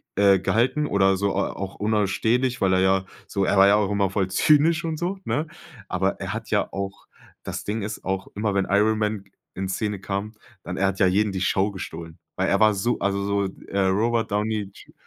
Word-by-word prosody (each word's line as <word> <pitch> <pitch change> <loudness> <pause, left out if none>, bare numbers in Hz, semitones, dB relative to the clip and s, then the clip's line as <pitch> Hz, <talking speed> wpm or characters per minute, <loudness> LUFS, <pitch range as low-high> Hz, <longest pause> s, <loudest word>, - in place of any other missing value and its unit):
äh, 100 -1 +5
gehalten 120 +10 +1
oder 95 -1 +3
so, 100 +1 0
äh, - - -4
auch 100 0 -3
unausstehlich, 110 +5 0
weil 95 -1 +3
er 95 - +3
ja, 95 0 +2 0.2
so 100 -1 -1
er 100 - +1
war 95 +1 +7
ja 100 - +5
auch 105 -1 +1
immer 100 -2 +1
voll 95 -1 0
zynisch 155 - +3
und 160 -1 -2
so, 185 +3 -2
ne? 155 +2 -1 0.4
Aber - - 0
er - - -3
hat - - -6
ja - - +1
auch 100 0 -5 0.4
das - - -5
Ding 110 +1 -2
ist 110 +1 -6
auch 95 +1 -2
immer, 105 -1 -1
wenn 95 - +2
Iron 105 +2 +2
Man 105 -2 -1 0.3
in 95 0 -3
Szene 105 0 -2
kam, 100 +2 -4 0.3
dann 90 - -5
er 95 0 +2
hat 95 0 -2
ja 95 - +5
jeden 100 +3 +2
die 95 - -2
Show 95 +2 +1
gestohlen. 85 -4 -8 0.2
Weil - - +1
er - - +2
war 110 -1 +6
so 120 +5 -1
also 100 0 0
so, 100 0 0 0.2
äh, 100 - -2
Robert 115 +4 +1
Downey 105 -1 -1
J - - -16
100 Hz, 220 wpm, -24 LUFS, 95-110 Hz, 0.4 s, war